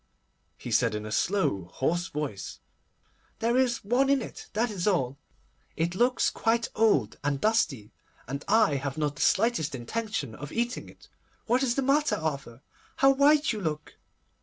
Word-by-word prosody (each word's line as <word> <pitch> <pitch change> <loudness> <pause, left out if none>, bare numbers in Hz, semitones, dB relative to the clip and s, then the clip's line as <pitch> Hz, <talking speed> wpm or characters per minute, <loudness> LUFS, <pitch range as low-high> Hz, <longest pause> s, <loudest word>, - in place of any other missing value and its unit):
he - - -7
said - - +2
in 105 0 -4
a 110 - -6
slow, 170 - 0
hoarse 175 +6 0
voice. 145 -10 -5 0.8
'There 230 +2 0
is 255 -2 +1
one 255 +6 +2
in 280 -1 +4
it, 245 - -8
that 225 +2 0
is 195 -2 -3
all. 140 -10 +1 0.6
It 170 +1 0
looks 245 +6 +2
quite 230 +1 0
old 205 - +2
and 145 -1 0
dusty, 150 - 0 0.4
and 140 +3 -5
I 210 -9 +4
have 140 +1 -4
not 150 -2 -1
the - - -5
slightest 195 - +2
intention 150 - -4
of 145 +6 -8
eating 240 +2 -2
it. - - -18 0.4
What 245 +3 +2
is 245 -3 +1
the 275 - 0
matter, 285 +3 +2
Arthur? 140 -6 -4 0.3
How 270 0 +5
white 290 +1 +4
you 215 - -5
look! 155 -3 -4
195 Hz, 165 wpm, -27 LUFS, -, 0.8 s, How